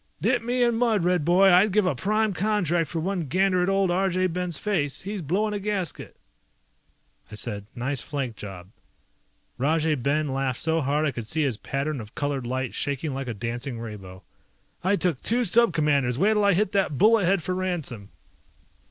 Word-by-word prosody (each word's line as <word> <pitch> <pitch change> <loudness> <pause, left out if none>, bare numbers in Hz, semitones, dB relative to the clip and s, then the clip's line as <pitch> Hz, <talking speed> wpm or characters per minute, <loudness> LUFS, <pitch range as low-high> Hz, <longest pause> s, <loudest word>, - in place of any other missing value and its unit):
"Dip 245 -2 +1
me 245 +2 0
in 235 -1 +2
mud, 225 -6 +2
Red 180 -2 +2
boy, 180 +4 +5
I'd 190 +4 +5
give 210 0 +2
a 180 - +2
prime 215 +1 0
contract 175 -6 0
for 165 - -3
one 175 -1 -2
gander 185 +4 +2
at 180 - +1
old 195 -2 +2
Arjay 185 0 +1
Ben's 180 -3 -2
face. 160 -10 -1
He's 200 0 -5
blowing 200 +8 0
a 205 - -2
gasket!" 200 -4 -3 1.2
I - - -7
said, 105 -2 -5
"Nice 130 +2 -2
flank 135 -6 -4
job." 95 -3 -9 0.9
Rajay 155 +3 +2
Ben 150 +3 0
laughed 135 -2 -2
so 160 0 +1
hard 145 +3 0
I 145 - +1
could 120 -3 -6
see 155 +6 0
his 130 -7 0
pattern 140 +2 -3
of 105 0 -12
colored 140 -4 -2
light 130 0 -2
shaking 140 +1 -2
like 135 0 -4
a 120 - -4
dancing 120 +3 -4
rainbow. 100 -5 -9 0.6
"I 190 +3 +3
took 180 -8 0
two 240 +2 +1
Sub 230 +3 +4
Commanders, 145 -6 +1
wait'll 210 +5 +3
I 200 - +5
hit 195 +2 +1
that 195 -8 0
bullet 215 0 +4
head 190 -1 +2
for 185 - -2
ransom!" 160 - -3
165 Hz, 185 wpm, -25 LUFS, 135-195 Hz, 1.2 s, boy